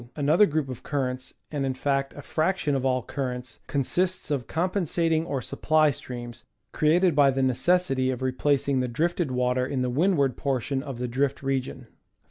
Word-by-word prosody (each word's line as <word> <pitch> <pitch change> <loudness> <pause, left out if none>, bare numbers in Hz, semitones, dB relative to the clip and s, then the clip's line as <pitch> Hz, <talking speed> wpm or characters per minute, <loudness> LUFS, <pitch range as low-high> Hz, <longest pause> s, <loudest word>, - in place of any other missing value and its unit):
Another 155 +8 +4
group 155 -2 -1
of 130 -3 -7
currents, 130 -2 -3 0.2
and 145 -2 -2
in 135 -1 -1
fact 135 0 -1
a 145 - -9
fraction 160 -1 0
of 135 -2 0
all 130 -2 +1
cur 135 -3 -3
rents, 125 -2 -9
consists 175 +6 -1
of 135 -5 -1
compensating 165 -2 0
or 135 -6 -2
supply 155 +3 +2
streams, 120 -2 -8 0.3
created 170 +2 +3
by 145 -2 +6
the 135 0 0
necessity 135 0 +2
of 130 0 -3
replacing 135 +1 +1
the 125 - 0
drifted 165 +5 0
water 125 0 +1
in 130 0 -1
the 125 - -1
windward 140 -3 +2
portion 135 -1 -1
of 135 -3 -6
the 125 +1 -2
drift 135 +3 -1
region. 135 -1 -2
135 Hz, 175 wpm, -26 LUFS, 130-155 Hz, 0.3 s, by